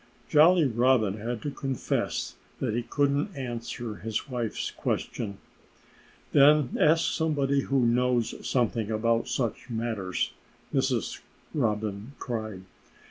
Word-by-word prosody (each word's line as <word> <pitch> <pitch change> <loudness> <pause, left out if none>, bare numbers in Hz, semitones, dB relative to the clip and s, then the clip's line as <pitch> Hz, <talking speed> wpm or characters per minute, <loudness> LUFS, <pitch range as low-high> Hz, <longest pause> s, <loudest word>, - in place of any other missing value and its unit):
Jolly 165 +2 +6
Robin 120 -4 +3
had 115 +1 -4
to 145 - -2
confess 135 -2 -2 0.3
that - - -1
he 120 - 0
couldn't 145 - 0
answer 120 -3 -5
his 110 0 -3
wife's 120 -4 -3
question. 100 -4 -3 0.9
"Then 145 -2 +5
ask 160 +2 +4
somebody 140 -4 +1
who 135 -2 +1
knows 120 -1 +2 0.2
something 115 -3 +1
about 115 +1 +1
such 120 -2 -2
matters!" 110 -5 -2 0.4
Mrs. - - 0 0.3
Robin 110 -2 -1
cried. 110 -6 -4
120 Hz, 110 wpm, -28 LUFS, 110-140 Hz, 0.9 s, Jolly